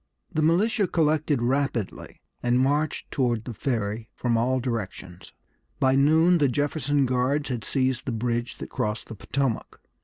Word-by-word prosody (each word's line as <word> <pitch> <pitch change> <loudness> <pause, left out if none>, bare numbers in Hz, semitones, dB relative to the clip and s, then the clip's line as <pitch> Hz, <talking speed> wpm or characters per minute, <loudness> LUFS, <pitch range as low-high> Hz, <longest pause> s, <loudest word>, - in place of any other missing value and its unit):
The 155 - +1
militia 200 +6 +3
collected 155 -5 +1
rapidly, 125 -4 -2 0.2
and 120 +1 +2
marched 145 +3 0
toward 120 -4 0
the 120 - -5
Ferry 110 -2 -2
from 120 -2 0
all 125 +3 +2
directions. 100 -7 -5 0.5
By 130 0 +3
noon 160 +6 +4
the 145 - +4
Jefferson 145 +1 +1
Guards 130 +4 0
had 120 -3 -3
seized 130 -2 -1
the - - 0
bridge 120 +1 -2
that - - -8
crossed 105 0 -3
the 110 - -6
Potomac. 130 +3 -2
130 Hz, 150 wpm, -26 LUFS, 120-145 Hz, 0.5 s, noon